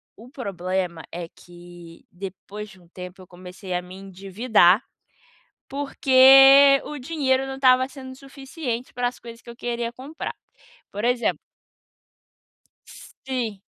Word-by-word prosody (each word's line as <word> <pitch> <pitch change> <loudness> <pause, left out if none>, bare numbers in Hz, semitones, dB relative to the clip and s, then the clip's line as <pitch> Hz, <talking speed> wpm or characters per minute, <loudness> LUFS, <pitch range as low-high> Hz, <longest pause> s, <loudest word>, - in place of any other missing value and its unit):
o 230 +3 -15
problema 185 - -4
é 170 -1 -6
que 175 -1 -15
depois 195 +3 -9
de 190 -3 -17
um 175 - -22
tempo 180 +1 -11
eu 185 - -15
comecei 180 +1 -9
a 180 - -1
me 180 +1 -12
endividar, 195 +1 +2 0.9
porque 270 0 +6
o 300 - -7
dinheiro 265 -2 0
não 270 - -5
estava 255 -1 +4
sendo 260 -1 -10
suficiente 270 -2 -7
para 245 0 -1
as 250 - -16
coisas 230 0 -12
que - - -15
eu 235 - -10
queria 235 -1 -3
comprar. 270 +6 -7 0.6
Por 205 +1 -6
exemplo 245 0 0 1.9
Sim. 240 -7 -3
235 Hz, 130 wpm, -23 LUFS, 185-265 Hz, 1.9 s, porque